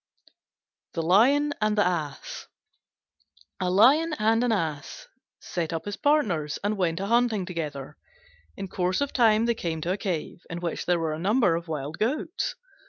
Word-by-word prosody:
THE 165 - -1
LION 270 - +4
AND 215 0 +1
THE 205 - +4
ASS 155 -6 -3 1.1
A 180 - 0
Lion 280 - +5
and 225 +2 +2
an 245 - +1
Ass 160 -9 -3 0.3
set 165 -3 -3
up 165 -1 -4
as 205 -1 -4
partners 210 - +1
and 205 +1 0
went 175 -4 0
a 195 - -2
hunting 230 -3 +2
together. 150 -6 -5 0.6
In 195 - -5
course 180 0 -1
of 285 - -1
time 225 -2 +4
they 235 - +2
came 165 -7 -3
to 170 - -1
a 190 - 0
cave 180 -5 -4
in 170 - -5
which 170 -2 -4
there 175 -1 +3
were 165 -2 -1
a 155 - -5
number 200 -1 +3
of 170 +1 -5
wild 150 0 -5
goats. 295 +9 -1
185 Hz, 170 wpm, -26 LUFS, 165-230 Hz, 1.1 s, Lion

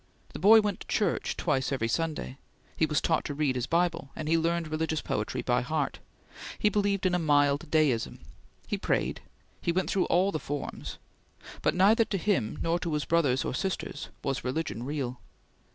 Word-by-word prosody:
The - - -6
boy 215 +6 +8
went 205 -2 -2
to - - -11
church - - 0
twice 130 +1 0
every 130 -5 0
Sunday; 150 0 -2 0.4
he 160 - +2
was 150 -1 +1
taught 160 - +1
to 145 - -4
read 145 -3 +1
his 125 0 -2
Bible, 170 -4 0
and 155 - -5
he 165 - +3
learned 165 0 0
religious 160 0 -1
poetry - - -2
by - - +2
heart; - - -2 0.6
he 210 - +3
believed 200 -2 0
in 185 - +2
a 180 - +2
mild 145 0 +2
deism; 150 -8 +2 0.5
he - - -3
prayed; - - 0 0.4
he 170 - +1
went 185 +2 0
through 190 - +2
all 185 +3 +3
the 155 - -2
forms; 145 0 -5 0.6
but - - +1
neither 215 +5 +5
to 200 - -2
him 175 - 0
nor 165 +1 +1
to 170 -3 -3
his 150 -1 -1
brothers 145 -6 +2
or - - -2
sisters 165 -1 -3
was 135 -1 -2
religion 130 -2 -2
real. 130 -2 -3
160 Hz, 185 wpm, -29 LUFS, 140-180 Hz, 0.6 s, boy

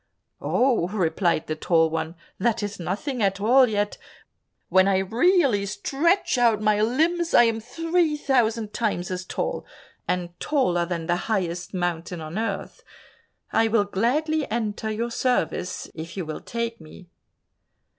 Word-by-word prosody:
"Oh," 245 -9 +2
replied 175 -3 0
the 155 - -3
Tall 160 0 +2
One, 160 +1 -3 0.2
"that 230 +2 +1
is 205 -1 -4
nothing 210 - -3
at 195 -1 +1
all 250 +5 +5
yet; 205 -1 -1 0.7
when 190 0 +4
I 195 -1 +3
really 235 - +3
stretch 285 - +1
out 230 -3 +4
my 215 0 +2
limbs, 325 +9 +1
I - - +8
am 230 -1 +1
three 325 +6 0
thousand 230 -6 +1
times 205 -6 -1
as 185 0 -3
tall, - - -3 0.4
and 180 -1 -1
taller 180 - +1
than 170 -2 -3
the 175 +1 +1
highest 180 -3 -2
mountain 175 -1 -2
on 160 +6 -5
earth. 225 - -4 0.7
I 225 - +4
will 220 -2 +2
gladly 290 +10 0
enter 220 -1 -2
your 230 +2 -2
service, 230 -7 -1
if 165 +4 -8
you 185 - -3
will 155 0 -6
take 230 -3 -4
me." 160 +3 -13
215 Hz, 145 wpm, -24 LUFS, 180-245 Hz, 0.7 s, I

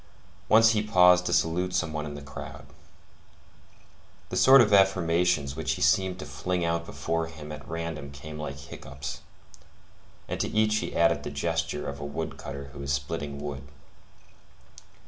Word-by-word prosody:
Once 110 +1 +7
he 105 -2 +1
paused 90 -3 +5
to - - -1
salute 90 +2 +1
some 90 -4 0
one 75 0 -3
in 75 - -6
the 70 - -8
crowd. 70 - -9 1.6
The - - -4
sort 135 +1 +8
of 105 -4 +4
affirmations 90 -6 +3
which - - -1
he - - -2
seemed 95 -1 +3
to 95 - -7
fling 85 +5 -2
out 85 0 -1
before 80 +4 -2
him 80 -2 -10
at 75 - -9
random 80 -4 -5
came 75 +2 -9
like 70 -2 -5
hiccoughs, 70 +1 -8 1.1
and - - -4
to - - 0
each 110 0 +2
he 110 - -4
added 85 -3 +3
the 75 - -5
gesture 80 +2 -2
of 70 0 -5
a - - -6
wood 70 +3 -4
cutter 70 0 -7
who 70 - -8
is 70 0 -3
splitting 70 +1 -3
wood. 70 -1 -5
80 Hz, 165 wpm, -27 LUFS, 70-90 Hz, 1.6 s, sort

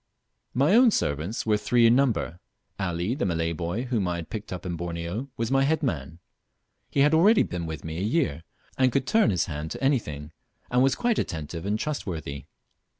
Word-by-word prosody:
My 140 +8 +3
own 245 +2 +7
servants 80 - -1
were 105 -1 +3
three 115 +3 +3
in 115 +1 +6
number. 120 -10 +1 0.4
Ali, 90 +2 -1
the 135 - -2
Malay 85 -2 0
boy 85 +8 -3
whom 120 -7 -1
I 90 - -1
had 85 -2 -7
picked 110 -1 -6
up 90 -1 -6
in 90 -1 -2
Borneo, 85 - -4
was 115 +1 -2
my 135 0 +4
head 155 +3 +1
man. 80 - -3 0.7
He 140 - +1
had 150 +2 +4
already 200 +7 +6
been 85 -2 -4
with 80 -1 -6
me 80 +1 -4
a - - -3
year, 110 - 0 0.4
could 130 0 +3
turn 220 - +3
his 90 -4 +1
hand 75 -1 -5
to 80 - -6
anything, 75 - -1 0.4
and 125 0 +3
was 135 0 +3
quite 240 -2 +1
attentive 80 +3 -4
and 105 +1 +1
trustworthy. 85 - -4
100 Hz, 195 wpm, -26 LUFS, 85-135 Hz, 0.7 s, own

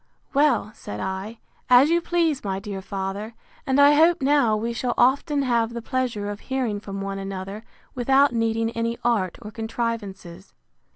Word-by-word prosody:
Well, 275 -7 +2
said 105 - -8
I, 190 - -4 0.3
as 255 +5 +6
you 340 0 +3
please, 330 -5 0
my 195 -2 -2
dear 195 -1 -6
father; 195 +3 -5 0.3
and 265 +1 +2
I 285 +1 +7
hope 325 +3 +5
now 270 -6 +3
we 230 +2 -2
shall 240 0 -2
often 280 +3 +2
have 235 -2 0
the 235 - -4
pleasure 245 -5 -2
of 205 0 -5
hearing 250 -6 -2
from 195 -1 -6
one 195 0 -4
another, 195 +2 -6 0.3
without 270 +2 +3
needing 225 0 0
any 230 0 -2
art 220 -7 0
or 210 - -8
contrivances. 210 -5 -5
230 Hz, 165 wpm, -24 LUFS, 200-265 Hz, 0.3 s, I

